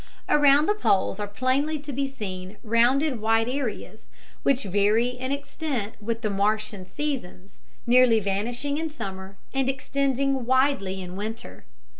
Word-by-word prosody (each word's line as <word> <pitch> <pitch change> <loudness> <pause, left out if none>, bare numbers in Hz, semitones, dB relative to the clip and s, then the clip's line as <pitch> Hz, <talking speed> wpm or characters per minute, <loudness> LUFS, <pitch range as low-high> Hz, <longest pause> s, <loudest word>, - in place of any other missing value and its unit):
Around 290 0 +5
the 415 - +3
poles 195 - +1
are 205 - -2
plainly 260 +8 0
to 290 -1 -7
be 275 +2 -1
seen 195 -6 -7
rounded 245 +3 +2
white 225 +1 +2
areas, 255 -3 -4 0.3
which 275 -1 +2
vary 205 +5 +2
in 250 +1 -5
extent 280 -5 -3
with 225 +2 -3
the 215 - -1
Martian 205 -1 -1
seasons, 200 -9 -5 0.3
nearly 240 -2 +5
vanishing 235 +9 -2
in 320 0 -2
summer 195 -8 -7 0.2
and 270 -1 +1
extending 275 0 0
widely 260 -8 +1
in 180 0 -8
winter. 220 +4 -6
240 Hz, 140 wpm, -25 LUFS, 205-275 Hz, 0.3 s, Around